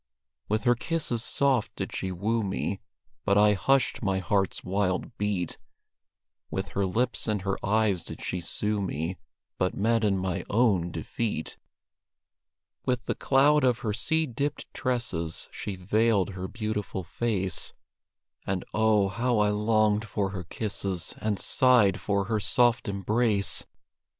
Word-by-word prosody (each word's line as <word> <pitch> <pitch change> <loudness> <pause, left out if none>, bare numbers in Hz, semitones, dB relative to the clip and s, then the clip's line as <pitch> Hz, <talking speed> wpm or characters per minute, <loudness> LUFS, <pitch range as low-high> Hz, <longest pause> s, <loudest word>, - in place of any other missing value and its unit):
With 110 +1 0
her 120 -1 +5
kisses 120 -3 -2
soft 135 -4 +1
did - - -4
she 95 - -2
woo 110 +6 0
me, 95 0 -2 0.4
But 100 - +3
I 105 0 +6
hushed 135 +6 +2
my 95 -4 +1
heart's 95 +1 0
wild 95 +3 -1
beat; 100 -4 -1 0.9
With - - -3
her 100 -1 0
lips 120 +7 -1
and 105 -3 -1
her 95 -1 -2
eyes 105 -3 +2
did - - -8
she 90 - -3
sue 105 +4 -1
me, 90 -1 -3 0.4
But 90 - +1
met 115 +2 +2
in 100 -2 +2
my 95 -1 -2
own 100 -6 +3
defeat. 85 +2 -3 1.3
With 125 -1 -1
the - - 0
cloud 145 +2 +4
of 125 -2 +2
her 105 - 0
sea 160 +8 +1
dipped 140 +2 -3
tresses 90 -11 -1
She 100 - -5
veiled 100 +2 +2
her 95 0 -5
beautiful 105 -3 -3
face 95 -2 -1 0.7
And, 95 -2 -1
oh, 110 -2 +3
how 120 +4 0
I 105 0 +3
longed 105 0 +2
for 100 -2 -2
her 90 -3 -5
kisses, 95 -2 -3
And 105 -2 -1
sighed 120 -7 +4
for 100 -1 +1
her 110 +1 0
soft 120 +3 +3
embrace! 100 +1 +1
105 Hz, 145 wpm, -27 LUFS, 95-115 Hz, 1.3 s, I